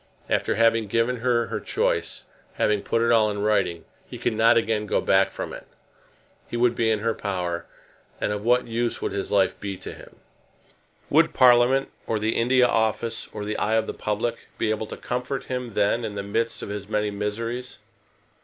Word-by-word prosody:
After - - +1
having 115 0 +3
given 115 +4 +1
her 120 0 +1
her - - -4
choice, - - -1 0.3
having 105 -1 +1
put 115 - 0
it 115 - +3
all 110 -2 +4
in 105 0 -3
writing, 100 -5 +1 0.2
he - - -7
could 120 - -1
not 115 +1 +5
again 110 -2 0
go - - +1
back - - +3
from - - -6
it. - - -10 0.8
He 120 - -4
would 120 0 +3
be 115 -1 +1
in 110 -1 +1
her 115 +1 +1
power, 90 -5 -3 0.5
and - - -1
of 105 0 -4
what 125 +2 +3
use 115 +1 -2
would - - -2
his 100 -1 -3
life 100 -2 +2
be 100 -2 -5
to - - -8
him? - - -14 1.0
Would 165 +3 +4
Parliament, 125 +1 +5 0.2
or 110 - 0
the 110 +1 -1
India 125 +2 +4
Office, 115 0 0
or 105 -1 -5
the 105 +1 -3
eye 110 +1 +1
of 110 0 +2
the - - -4
public 105 +3 -3
be 110 - 0
able 110 0 -2
to - - -7
comfort 125 +2 -3
him 125 -4 -5
then 115 +4 +2
in 105 -2 -4
the 100 - -3
midst 115 +3 -2
of - - -6
his 100 0 -6
many 105 -1 0
miseries? 115 +5 -4
110 Hz, 200 wpm, -24 LUFS, 105-120 Hz, 1.0 s, not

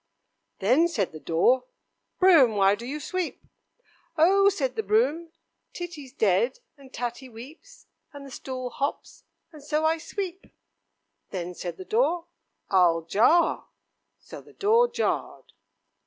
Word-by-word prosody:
"Then," 255 - +3
said 245 - -2
the 155 - -10
door, 240 +12 +2 0.5
"Broom, 320 - +6
why 195 0 +4
do 230 +4 -6
you 295 +3 -4
sweep?" 370 +2 -4 0.7
"Oh!" 390 +5 +5
said 270 -10 -2
the - - -1
broom, 255 - +1 0.4
"Titty's 325 -7 -8
dead, 475 - +1 0.2
and 275 -3 -17
Tatty 245 +2 -5
weeps, 280 - -13 0.3
and 285 -1 -10
the 275 - -11
stool 255 -1 -6
hops, 280 +1 -5 0.3
and 305 -3 -14
so 300 +1 0
I 320 +1 +2
sweep." 380 +1 -6 0.8
"Then," 180 -1 -5
said 175 0 -6
the 375 - -9
door, 360 -7 +1 0.5
"I'll 175 -3 +4
jar." 230 - +2 0.5
So - - -11
the - - -19
door 455 +4 +3
jarred. - - -3
280 Hz, 135 wpm, -26 LUFS, 230-345 Hz, 0.8 s, Broom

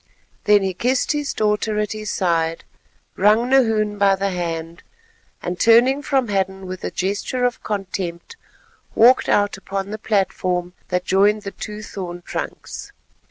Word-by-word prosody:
Then 205 -1 +5
he 190 -1 -1
kissed 250 +7 0
his 295 -1 -1
daughter 210 0 0
at 210 0 -1
his 215 -1 -5
side, 165 -3 0 0.5
wrung 215 +6 +3
Nahoon 220 -5 +2
by 200 -1 +4
the 195 0 -1
hand, 165 -1 -4 0.6
and 175 +1 -4
turning 245 +5 +5
from 265 -5 0
Hadden 190 -1 -1
with 185 0 -7
a - - -1
gesture 205 +6 -1
of 245 0 -1
contempt 190 - -4 0.6
walked 245 +3 +5
out 205 -1 +2
upon 195 +1 -4
the 215 - -5
platform 185 -4 -1
that 180 0 -1
joined 205 +2 +3
the 200 - -5
two 210 +1 -7
thorn 175 -4 -7
trunks. - - -6
200 Hz, 150 wpm, -21 LUFS, 185-220 Hz, 0.6 s, Then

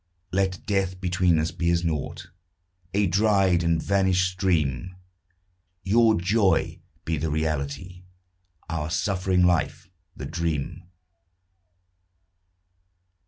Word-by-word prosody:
Let 95 -1 -1
death 95 -2 -1
between 90 -2 +2
us 80 +1 0
be 85 - -1
as 85 0 +1
naught, 80 +2 -4 0.6
A 100 +3 +2
dried 95 -1 +3
and 85 -1 +1
vanished 95 -2 +2
stream; 90 -4 -1 0.9
Your 110 +2 +4
joy 100 +2 +1 0.3
be 80 0 -1
the 80 +2 -2
reality. 80 +4 -3 0.7
Our 80 -2 -3
suffering 90 +2 +1
life 85 +1 0 0.3
the - - -6
dream. 85 0 -3
90 Hz, 100 wpm, -25 LUFS, 80-95 Hz, 0.9 s, Your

